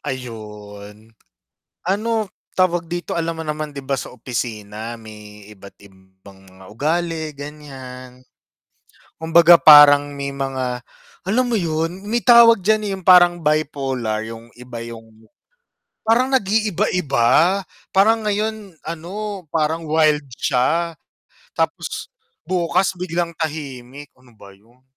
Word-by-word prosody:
Ayun. 105 -3 -9 0.8
Ano 215 +3 0 0.3
tawag 175 -2 +1
dito 175 0 -4
alam 165 0 -2
mo 160 - -5
naman 155 0 -4
'di 140 -1 -9
ba 135 - -2
sa - - -6
opisina 115 -2 -6
may 105 -2 -13
iba't 100 -1 -15
ibang 95 0 -19
mga 95 0 -17
ugali 160 +4 -2
ganyan, 130 -4 -10 0.9
kumbaga 165 +1 +6
parang 145 -2 +8
may 140 0 -4
mga, 130 -2 -3 0.4
alam 215 +7 +1
mo 240 - 0
yun 165 0 -2
may 240 - +2
tawag 235 -2 +7
dyan 210 +2 +1
yung 185 - -18
parang 175 -1 +6
bipolar 135 -7 -1
yung 115 +1 -10
iba 120 -2 -8
yung 115 -1 -13 0.7
parang 230 +4 +3
nag-iiba-iba 190 - +1 0.3
parang 220 +2 +3
ngayon 210 -3 -3
ano 190 +5 -6
parang 160 +1 -1
wild 155 -2 +2
siya 165 +7 0 0.6
tapos - - -3 0.4
bukas 185 +1 0
biglang 170 -2 -3
tahimik, 145 -3 -6
ano 125 -1 -22
ba 100 -3 -16
yun? 120 +6 -28
150 Hz, 115 wpm, -20 LUFS, 120-175 Hz, 0.9 s, parang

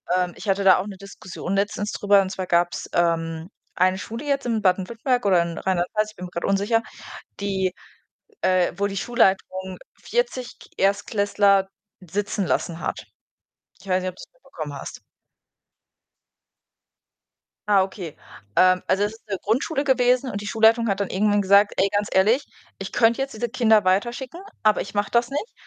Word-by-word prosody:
ähm, 180 -1 0
ich - - -10
hatte 195 +1 +1
da 190 -2 +7
auch 190 - -3
'ne 195 - -8
Diskussion 195 -1 -6
letztens 205 +1 -1
drüber, 200 -1 +4
und 190 - -3
zwar 185 -1 -5
gab 175 0 +2
's, - - -6
ähm, 165 0 0 0.3
eine 185 +1 +2
Schule 230 +7 -7
jetzt 275 -2 -1
in 225 -2 0
Baden-Württemberg 225 +6 0
oder 185 -4 +4
in 170 -1 -6
Rheinland 180 -2 -1
Pfalz, 215 0 0
ich - - -25
bin 180 - -10
mir 175 - -10
grad 170 - -4
unsicher, 205 +4 +1 0.6
die, 190 -2 -1 0.7
äh 185 -1 +2
wo 200 - +1
die 200 -1 -5
Schulleitung 190 -4 0 0.2
40 475 - -2
K - - -16
Erstklässler 200 0 +2 0.3
sitzen 195 +2 -3
lassen 170 -1 -1
hat. - - -4 0.8
Ich 195 - -15
weiß 185 0 +1
nicht, 185 - -2
ob 180 - -19
du - - -11
es - - -60
mitbekommen - - -8
hast. - - -8 2.7
Ah, 195 -2 +5
okay. 190 -4 -6 0.4
Ähm, 185 0 +5
also, 190 +2 +1
es 210 - -2
ist 225 0 -18
'ne 200 - -2
Grundschule 270 +7 0
gewesen 255 -1 +2
und 200 - -4
die 205 - -7
Schulleitung 225 +1 +3
hat 195 0 -1
dann 200 - -2
irgendwann 205 +1 +2
gesagt: 200 +1 +4
„Ey, 195 +1 +2
ganz 205 0 +1
ehrlich, 220 +9 +3 0.3
ich 195 0 -7
könnte 235 +2 +3
jetzt 270 -3 -3
diese 235 +1 -3
Kinder 220 -4 +3
weiterschicken, 240 - -1 0.2
aber 215 -1 +3
ich - - -7
mache 205 0 0
das 235 0 +2
nicht, 290 +11 -4
200 Hz, 180 wpm, -23 LUFS, 185-225 Hz, 2.7 s, da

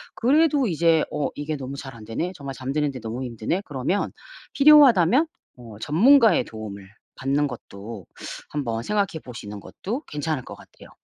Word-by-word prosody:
그래도 285 +1 +3
이제 165 -2 +3
'어 145 - -1
이게 150 +1 -3
너무 135 0 -6
잘 135 -3 -8
안되네? 115 +11 -4
정말 140 -3 -7
잠드는데 135 0 -2
너무 115 +4 -4
힘드네?' 120 - -2
그러면 145 +8 -1 0.4
필요하다면 280 - +6 0.3
어 115 -3 -11
전문가의 225 - +5
도움을 100 -3 -8 0.3
받는 140 +2 0
것도 105 -4 -9 0.4
한번 115 -6 -3
생각해 200 -6 -1
보시는 105 -4 -8
것도 225 - -5
괜찮을 150 -2 -3
것 - - -9
같아요. - - -16
145 Hz, 335 characters per minute, -24 LUFS, 115-195 Hz, 0.4 s, 필요하다면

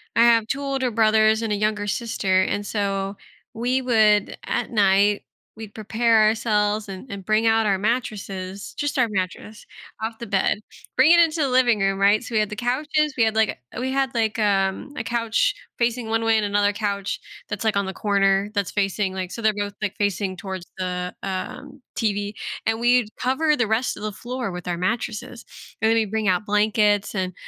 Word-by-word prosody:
I 230 - +6
have 230 -2 +4
2 275 - -2
older 270 -3 -1
brothers 220 0 +3
and 220 -2 -1
a - - +1
younger 210 0 -1
sister, 195 -4 +1
and 205 +1 -2
so, 200 -1 -2 0.4
we 250 +3 0
would 215 -4 +3
at 240 - -2
night, 205 -1 +3 0.3
we'd 220 -2 -9
prepare 225 +1 +2
ourselves 215 -1 +1
and 195 +6 -9
and 195 -2 -7
bring 215 +1 +2
out 225 0 +3
our 195 -2 +2
mattresses 200 -3 -3
just 290 -1 -2
our 240 -3 +3
mattress 195 +2 -4 0.4
off 225 0 -3
the 235 - -5
bed, 200 +1 +1 0.4
bring 270 +6 +6
it 340 - +7
into 325 -1 +3
the 275 - +1
living 245 -4 +3
room, 195 0 +1
right? 205 +3 +4
So, 235 - -6
we - - +4
had 210 - 0
the 210 - -5
couches, 295 +5 0
we 230 - +4
had, 220 0 +1
like, 220 -1 +3 0.2
eh - - -5
we 260 +1 -2
had, 270 -2 0
like, 220 -1 0
um, 195 +6 0
a 225 - -2
couch 230 -1 +1 0.2
facing 235 -1 -1
one 225 0 0
way 225 0 +3
and 210 - +1
another 205 0 +2
couch 200 -2 -2 0.3
that's, 205 +1 -4
like, 220 -2 +1
on 200 - +1
the 190 - -4
corner 200 -1 +2
that's 200 -3 -1
facing, 195 -1 -1
like 185 -1 -4
so 230 - -6
they're 215 -1 +3
both, 205 0 -3
like, 205 -1 -2
facing 200 -2 -1
towards 190 -2 -6
the, 180 -1 -3
um, 265 +9 -6 0.2
TV. 205 -2 -1 0.3
And 225 0 0
we'd 240 -2 +3
cover 300 +4 +2
the 225 -3 +1
rest 220 +2 0
of 210 - -9
the 215 - -2
floor 240 0 -5
with 180 0 -7
our 175 -1 -1
mattresses, 230 +4 -3 0.4
and 220 - +3
then 225 - +4
we'd 220 -3 0
bring 220 -2 -1
out 185 +3 +1
blankets 210 0 +2
and 185 -2 -2
215 Hz, 205 wpm, -23 LUFS, 200-235 Hz, 0.4 s, it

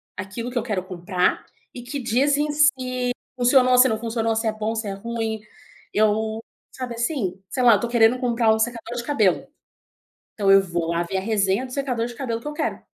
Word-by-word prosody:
aquilo 205 +6 -5
que 245 - -4
eu 235 - 0
quero 210 -6 -2
comprar, 180 0 -1 0.3
e 245 - -8
que 250 +4 -5
dizem 280 +5 +1
se 255 -4 +1 0.3
funcionou, 250 0 +5
se 250 +1 +7
não 220 -3 -1
funcionou, 225 0 -1
se 225 +1 -1
é - - +2
bom, 215 +1 -3
se 220 -1 -3
é - - -2
ruim. 225 +1 -4 0.5
Eu 220 +1 +1 0.3
sabe 250 -2 -6
assim, 230 - -2
sei 255 - -1
lá, 240 -2 +7
eu - - 0
tô 235 - -2
querendo 235 +1 +3
comprar 235 -3 +2
um 220 - -1
secador 235 +1 -2
de 235 - -3
cabelo. 220 -10 +1 0.9
Então 200 -2 +1
eu 195 - +8
vou 170 -3 -3
lá 170 0 0
ver 175 +3 -4
a - - 0
resenha 200 +2 +1
do 250 - -12
secador 250 -4 -1
de 240 - -8
cabelo 230 -3 -3
que - - -14
eu - - -5
quero. 300 - -3
230 Hz, 215 wpm, -23 LUFS, 210-250 Hz, 0.9 s, eu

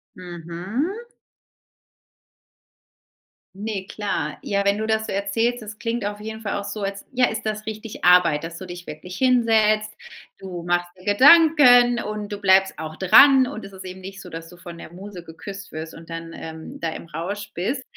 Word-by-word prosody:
Mhm. 185 - -5 2.5
Ne, 200 -2 -4
klar. 180 -8 -3
Ja, 200 0 0
wenn 200 0 +3
du 220 - -2
das 220 0 0
so - - -4
erzählst, 225 +5 0
das 215 0 -9
klingt 230 -2 -2
auf 205 0 -4
jeden 220 +1 -7
Fall 205 -3 -3
auch - - -5
so, 205 +1 -5
als 195 0 -4
ja, 255 0 +3
ist 225 0 -3
das 215 0 -3
richtig 215 0 -7
Arbeit, 170 -4 +5
dass 165 0 -6
du 185 - -7
dich 175 0 -9
wirklich 170 +5 -8
hinsetzt. 220 -4 +3 0.5
Du 185 -3 -7
machst 175 0 0
dir 185 - -16
Gedanken 260 -3 +7
und 210 0 -5
du 205 - -3
bleibst 190 -1 +4
auch 155 0 -6
dran. 260 +7 +7
Und 220 - -7
es 195 - -12
ist 190 0 -10
eben 185 +1 -8
nicht 195 +1 -9
so, 180 - -11
dass 165 -1 -8
du 175 - -14
von 175 -1 -10
der 170 - -11
Muse 190 -1 -9
geküsst 195 +4 -9
wirst 160 +1 -7
und 165 0 -13
dann, 165 0 -7
ähm, 160 0 -9
da 165 - -2
im 165 - -8
Rausch 195 +6 -5
bist. 245 +10 -2
200 Hz, 185 wpm, -23 LUFS, 175-220 Hz, 2.5 s, Gedanken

